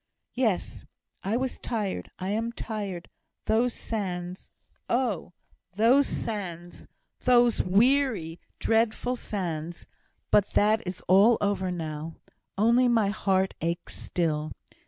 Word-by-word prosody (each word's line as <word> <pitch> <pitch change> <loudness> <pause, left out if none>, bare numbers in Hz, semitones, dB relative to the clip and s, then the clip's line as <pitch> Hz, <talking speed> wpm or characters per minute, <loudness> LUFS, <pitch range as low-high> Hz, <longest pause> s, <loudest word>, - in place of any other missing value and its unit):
"Yes! 225 -8 -1 0.4
I 210 +4 0
was 260 0 -3
tired. 210 -5 -3
I 185 +1 -4
am 225 +3 -1
tired. 200 -7 -5 0.4
Those 235 +3 +2
sands 180 -4 -4 0.4
oh! 235 -9 0 0.4
those 245 +7 +5
sands, 175 -6 -5 0.3
those 240 -2 +4
weary, 210 - +2 0.2
dreadful 230 +2 +1
sands! 175 -7 -4 0.5
But 205 -1 +3
that 215 +2 +3
is 180 - -5
all 200 +6 +6
over 200 -2 0
now. 160 -2 -5 0.4
Only 235 +4 +4
my 225 -4 +3
heart 190 -2 +1
aches 170 +2 -3
still. 155 -3 -2
205 Hz, 110 wpm, -27 LUFS, 175-230 Hz, 0.5 s, all